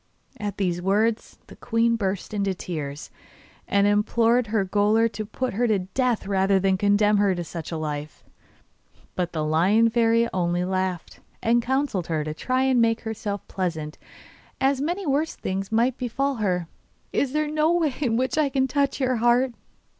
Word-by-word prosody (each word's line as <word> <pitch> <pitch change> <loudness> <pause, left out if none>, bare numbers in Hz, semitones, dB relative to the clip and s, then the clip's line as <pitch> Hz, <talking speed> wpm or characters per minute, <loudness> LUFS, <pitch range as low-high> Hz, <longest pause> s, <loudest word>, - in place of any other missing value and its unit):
At 205 -2 -4
these 175 -3 -1
words 215 +4 0
the - - -14
queen 230 0 +1
burst 195 -2 -3
into 200 -2 -1
tears, 150 -5 -6 0.6
and 200 0 +3
implored 225 +3 +2
her 210 -2 +1
gaoler 210 +4 +3
to 215 0 -6
put 255 +3 -3
her 240 +4 +1
to 215 -2 +2
death 230 +6 -1
rather 195 0 +2
than 190 0 +2
condemn 205 +2 +3
her 200 -2 +2
to 175 - -3
such 165 0 -7
a 165 - -3
life; 150 -1 -5 0.9
but 175 -1 -2
the 155 -2 -2
Lion 195 +9 +3
Fairy 230 0 +3
only 175 -1 0
laughed, 185 -2 -3 0.2
and 235 +1 +3
counselled 255 - -1
her 155 -2 -1
to 155 0 -4
try 255 +10 0
to 265 - +3
make 230 -2 +2
herself 220 -2 -5
pleasant, 160 -5 -4 0.6
as 270 0 +2
many 350 +6 -2
worse 295 +2 0
things 190 +1 -4
might 235 +3 +1
befall 270 +2 -1
her. 180 -5 -1 0.5
'Is 275 - +1
there 305 0 +1
no 305 +2 +1
way 330 -5 +1
in 235 -5 +1
which 260 +4 0
I 295 -2 +2
can 265 0 +1
touch 280 +1 0
your 255 -2 +1
heart? 240 +2 +3
215 Hz, 175 wpm, -24 LUFS, 185-250 Hz, 0.9 s, and